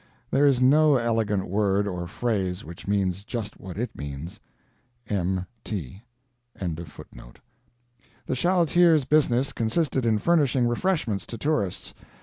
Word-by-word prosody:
There 145 Hz, +2 st, +4 dB
is 135 Hz, -3 st, +3 dB
no 145 Hz, +3 st, +5 dB
elegant 110 Hz, -5 st, 0 dB
word 100 Hz, +1 st, +1 dB
or 90 Hz, -3 st, -4 dB
phrase 100 Hz, -3 st, -2 dB
which 85 Hz, +4 st, -10 dB
means 100 Hz, -1 st, 0 dB
just 105 Hz, -1 st, -5 dB
what 95 Hz, -1 st, -8 dB
it 120 Hz, +3 st, -3 dB
means. 75 Hz, +4 st, -7 dB, 0.7 s
M.T. 95 Hz, -, -4 dB, 0.5 s
The 80 Hz, -8 st, -8 dB, 1.0 s
chaleteer's 170 Hz, -1 st, +3 dB
business 135 Hz, -3 st, +2 dB
consisted 130 Hz, +4 st, 0 dB
in 110 Hz, -1 st, +3 dB
furnishing 135 Hz, -3 st, +2 dB
refreshments 120 Hz, -, -1 dB
to 115 Hz, -, -6 dB
tourists. 110 Hz, -, -2 dB
110 Hz, 115 wpm, -25 LUFS, 95-135 Hz, 1.0 s, no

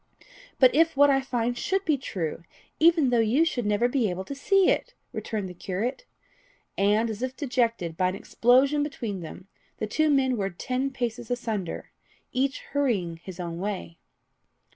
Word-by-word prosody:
"But 255 Hz, -2 st, +6 dB
if 320 Hz, 0 st, +3 dB
what 285 Hz, 0 st, +7 dB
I 270 Hz, 0 st, +3 dB
find 245 Hz, -2 st, -1 dB
should 385 Hz, +10 st, -1 dB
be 310 Hz, -, +3 dB
true, 180 Hz, -, -4 dB, 0.4 s
even 320 Hz, -5 st, +5 dB
though 240 Hz, -, +3 dB
you 235 Hz, +9 st, +3 dB
should 245 Hz, -9 st, -1 dB
never 210 Hz, +3 st, +2 dB
be 245 Hz, -4 st, +1 dB
able 180 Hz, +1 st, -4 dB
to 280 Hz, -, -5 dB
see 385 Hz, +7 st, +3 dB
it!" -, -, 0 dB, 0.2 s
returned 210 Hz, -4 st, -3 dB
the 180 Hz, -, -8 dB
curate. 210 Hz, -, -3 dB, 0.7 s
And 210 Hz, +3 st, +2 dB
as 220 Hz, 0 st, -5 dB
if 255 Hz, 0 st, -3 dB
disjected 230 Hz, -, -1 dB
by 185 Hz, +1 st, +2 dB
an 185 Hz, -, -4 dB
explosion 260 Hz, +8 st, +3 dB
between 235 Hz, -9 st, -3 dB
them, 175 Hz, +3 st, -9 dB, 0.3 s
the -, -, -2 dB
two 310 Hz, +9 st, +1 dB
men 260 Hz, -3 st, +2 dB
were 195 Hz, -2 st, -1 dB
ten 255 Hz, +9 st, -2 dB
paces 240 Hz, -2 st, -4 dB
asunder, 225 Hz, -7 st, -3 dB, 0.4 s
each 265 Hz, +1 st, 0 dB
hurrying 215 Hz, -13 st, 0 dB
his 185 Hz, +2 st, -10 dB
own 170 Hz, -1 st, -4 dB
way. 190 Hz, -4 st, -4 dB
240 Hz, 170 wpm, -26 LUFS, 195-275 Hz, 0.7 s, what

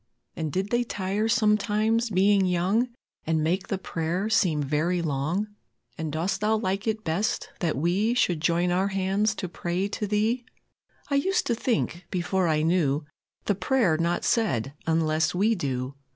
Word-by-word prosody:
And 155 Hz, -2 st, -3 dB
did 190 Hz, +6 st, -2 dB
they 240 Hz, 0 st, +2 dB
tire 205 Hz, 0 st, -2 dB
sometimes, 220 Hz, 0 st, +2 dB
being 195 Hz, 0 st, +3 dB
young, 190 Hz, +8 st, +1 dB, 0.4 s
And 160 Hz, -1 st, +1 dB
make 180 Hz, +4 st, 0 dB
the 195 Hz, -, -1 dB
prayer 180 Hz, +3 st, -2 dB
seem 175 Hz, -9 st, +2 dB
very 155 Hz, +6 st, 0 dB
long? 165 Hz, +6 st, -1 dB, 0.5 s
And 160 Hz, -2 st, -4 dB
dost 185 Hz, +6 st, -1 dB
Thou 215 Hz, +1 st, +2 dB
like 195 Hz, 0 st, -2 dB
it 220 Hz, 0 st, -1 dB
best, 180 Hz, +6 st, -1 dB
that 165 Hz, -6 st, 0 dB
we 190 Hz, -, +1 dB
Should 175 Hz, -9 st, +1 dB
join 170 Hz, +2 st, +2 dB
our 185 Hz, +2 st, +2 dB
hands 195 Hz, +2 st, 0 dB
to 185 Hz, -, -4 dB
pray 175 Hz, +2 st, -2 dB
to 210 Hz, +1 st, -3 dB
Thee? 220 Hz, +4 st, +1 dB, 0.7 s
I -, -, +1 dB
used 365 Hz, +7 st, +2 dB
to 240 Hz, -, +1 dB
think, 220 Hz, -7 st, -1 dB
before 180 Hz, +1 st, 0 dB
I 155 Hz, -1 st, +2 dB
knew, 155 Hz, -4 st, +1 dB, 0.4 s
The 205 Hz, -, +2 dB
prayer 195 Hz, -2 st, +2 dB
not 170 Hz, +2 st, 0 dB
said 140 Hz, -, +1 dB
unless 160 Hz, 0 st, +1 dB
we 210 Hz, +5 st, +3 dB
do. 130 Hz, -, -3 dB
185 Hz, 165 wpm, -26 LUFS, 165-215 Hz, 0.7 s, being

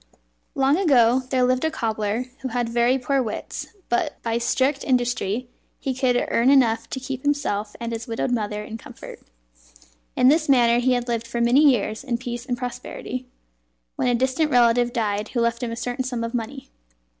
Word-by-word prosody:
Long 275 Hz, +3 st, +3 dB
ago 255 Hz, -9 st, +4 dB
there 260 Hz, -1 st, +2 dB
lived 255 Hz, +2 st, +2 dB
a 320 Hz, -, +2 dB
cobbler 220 Hz, -4 st, -2 dB
who 265 Hz, -, -4 dB
had 245 Hz, -1 st, -1 dB
very 240 Hz, +2 st, +2 dB
poor 270 Hz, +1 st, 0 dB
wits, 220 Hz, -4 st, -5 dB, 0.2 s
but 350 Hz, -5 st, -1 dB
by 230 Hz, 0 st, 0 dB
strict 260 Hz, +4 st, +1 dB
industry 245 Hz, -2 st, 0 dB, 0.3 s
he 265 Hz, -, -2 dB
could 250 Hz, -1 st, +1 dB
earn 235 Hz, +3 st, +3 dB
enough 230 Hz, -4 st, +3 dB
to 265 Hz, -, -4 dB
keep 260 Hz, 0 st, -5 dB
himself 260 Hz, -8 st, -1 dB
and 235 Hz, 0 st, -4 dB
his 225 Hz, 0 st, -5 dB
widowed 230 Hz, +2 st, -2 dB
mother 210 Hz, -3 st, -2 dB
in 225 Hz, +1 st, -8 dB
comfort. -, -, -11 dB, 1.0 s
In 250 Hz, -, +4 dB
this 305 Hz, +2 st, +3 dB
manner 240 Hz, -3 st, +5 dB
he 255 Hz, +1 st, +2 dB
had 245 Hz, 0 st, -1 dB
lived 230 Hz, -1 st, -2 dB
for 235 Hz, 0 st, -3 dB
many 240 Hz, +3 st, +4 dB
years 215 Hz, -3 st, 0 dB
in 245 Hz, -4 st, -1 dB
peace 240 Hz, 0 st, -6 dB
and 245 Hz, -2 st, -1 dB
prosperity, 250 Hz, 0 st, -6 dB, 0.7 s
when -, -, 0 dB
a 245 Hz, -, +3 dB
distant 260 Hz, +5 st, +1 dB
relative 240 Hz, -1 st, +4 dB
died 215 Hz, -3 st, -1 dB
who 245 Hz, -, -2 dB
left 235 Hz, +1 st, 0 dB
him 245 Hz, -, -2 dB
a -, -, -3 dB
certain 245 Hz, +2 st, -3 dB
sum 250 Hz, -2 st, -3 dB
of 230 Hz, +1 st, -4 dB
money. 255 Hz, +3 st, -5 dB
245 Hz, 190 wpm, -23 LUFS, 230-260 Hz, 1.0 s, manner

